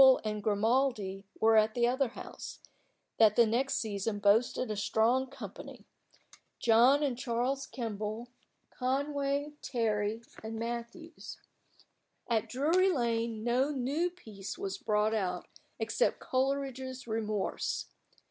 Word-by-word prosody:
Kemble 265 -1 +8
and 210 -1 -2
Grimaldi 210 -2 +1
were 225 0 +5
at 215 0 +4
the 240 -1 +3
other 260 +2 +2
house, 235 - -9 0.6
that 215 -2 +6
the 235 - +6
next 245 +5 +1
season 205 -1 -2
boasted 215 +4 +2
a - - -1
strong 230 +5 +2
company 275 - -9 0.7
John 245 +6 +5
and 270 -4 +1
Charles 255 +3 -1
Kemble, 220 -1 -4 0.4
Conway, 280 +2 -1
Terry, 220 -2 -1 0.2
and 220 0 -5
Matthews. 235 +8 -6 0.9
At 225 -3 0
Drury 330 +9 +3
Lane 230 -5 -1
no 250 +4 +2
new 290 +5 0
piece 215 - -8
was 195 0 -4
brought 215 0 +1
out 180 -4 -1 0.3
except 230 - +1
Coleridge's 260 -1 -2
"Remorse." 215 -3 -2
235 Hz, 120 wpm, -31 LUFS, 215-265 Hz, 0.9 s, Kemble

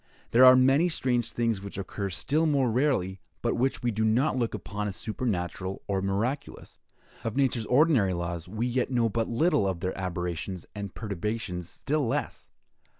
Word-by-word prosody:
There 120 +2 +6
are 130 0 +10
many 135 +7 +4
strange 125 -6 0
things 115 -4 0
which 100 -1 -8
occur 100 +1 -4
still 150 - 0
more 135 -5 +2
rarely, 110 -8 +1 0.2
but - - +1
which 130 +2 0
we 120 - +1
do 110 +1 -1
not 120 +7 +2
look 120 -3 -1
upon 105 -1 -4
as 100 - -4
supernatural 95 -5 -3
or 95 -1 -1
miraculous. 105 +9 -3 0.4
Of 115 - -3
nature's 130 -5 +1
ordinary 125 - +4
laws, 85 0 -4
we 110 +4 -2
yet 125 0 0
know 120 -3 +2
but 115 +1 -1
little; 150 - +2
of 95 -3 -2
their 95 - -2
aberrations 90 -1 -4
and 100 -3 -6
perturbations, 100 -3 -4
still 145 +3 -1
less. - - -3
115 Hz, 170 wpm, -28 LUFS, 95-130 Hz, 0.4 s, are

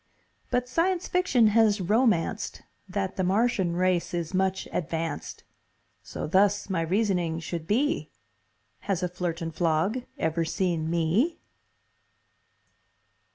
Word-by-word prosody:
But 250 0 0
science 350 +6 0
fiction 275 - +3
has 220 -2 +4
romanced 210 -1 +1 0.3
That 195 0 -3
the 190 - +1
Martian 190 -2 +1
race 180 0 +1
is 170 0 -3
much 190 0 0
advanced; 165 -2 -3 0.6
So - - -6
thus 200 +4 +2
my 175 -3 +1
reasoning 175 -2 0
should 165 0 -5
be, 275 +9 +1 0.8
Has 190 -2 0
a - - +2
Flirtenflog 170 +4 -1
ever 160 +1 0
seen 165 -1 -1
ME?????? 170 - +1
185 Hz, 110 wpm, -27 LUFS, 170-220 Hz, 0.8 s, has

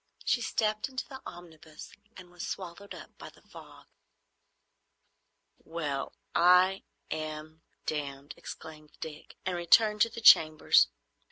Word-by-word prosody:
She 240 - +1
stepped 215 0 -1
into 260 -1 -5
the 265 -1 -10
omnibus 160 -3 -12 0.3
and 180 -1 -13
was 175 0 -7
swallowed 190 +2 -7
up - - -13
by - - -9
the - - -22
fog. - - -14 1.8
"Well—I—am—damned!" 155 -2 -2
exclaimed 155 -1 -11
Dick, 155 -2 -9
and 185 -1 -1
returned 210 +5 +4
to 230 - +5
the 230 - -8
chambers. 155 - +6
170 Hz, 105 wpm, -29 LUFS, 155-195 Hz, 1.8 s, chambers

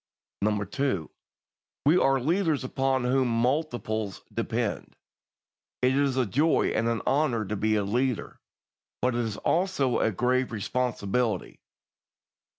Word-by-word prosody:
2. 130 - -1 0.7
We 150 +4 +5
are 135 -6 +3
leaders 160 +1 +1
upon 130 0 0
whom 130 +1 +2
multitudes 120 -4 -1
depend. - - -2 0.9
It 130 +1 +4
is 140 -2 +1
a 130 - +3
joy 145 - +2
and 115 - 0
an 115 -1 -1
honour 130 -6 +1
to 105 - -3
be 110 +1 +1
a 105 - +1
leader, 120 +4 -1 0.6
but 125 0 +2
it 120 - 0
is 110 -3 -3
also 165 -8 +1
a 115 - +2
grave 125 +5 +1
responsibility. 115 -1 -1
125 Hz, 125 wpm, -27 LUFS, 110-135 Hz, 0.9 s, We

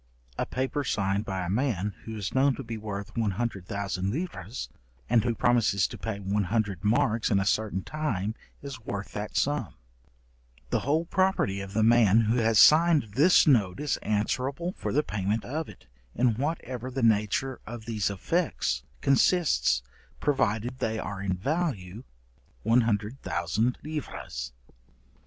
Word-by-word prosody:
A - - -2
paper 130 +3 -2
signed 100 -4 0
by 95 -2 -3
a - - -4
man, 105 -4 0
who 110 -1 -6
is 100 -3 -4
known 135 0 +3
to 135 - -6
be 115 -1 -5
worth 105 -1 -6
100,000 100 -3 -2
livres, 120 - -4 0.4
and 115 - +3
who 120 -1 0
promises 115 -5 +3
to - - -7
pay 110 -3 -4
100 100 -1 -1
marks 110 +1 +2
in 100 - +3
a 95 - 0
certain 100 -2 0
time 110 -10 -2 0.3
is 135 -4 -7
worth 100 -1 -5
that 105 0 -4
sum; 145 +1 0 1.0
the - - +2
whole 155 +5 0
property 185 - +1
of 95 0 -8
the 110 - +3
man 115 -2 +5
who 115 +2 +1
has 115 -2 +3
signed 155 - +6
this 155 - +6
note 110 -8 +3
is 150 -1 0
answerable 130 - -1
for - - -4
the 150 - +2
payment 105 0 -2
of 155 +5 -3
it, - - -14 0.3
in 120 -1 +3
whatever 130 -2 -3
the 130 -1 -3
nature 115 +4 +2
of 115 -1 -7
these 110 -4 -1
effects 100 - -1 0.2
consists, 135 - +3 0.4
provided 125 -3 0
they 110 0 -1
are 100 -2 -5
in 95 -2 -1
value 120 - -2 0.6
100,000 115 +1 +1
livres. 135 - -5
110 Hz, 145 wpm, -28 LUFS, 100-135 Hz, 1.0 s, signed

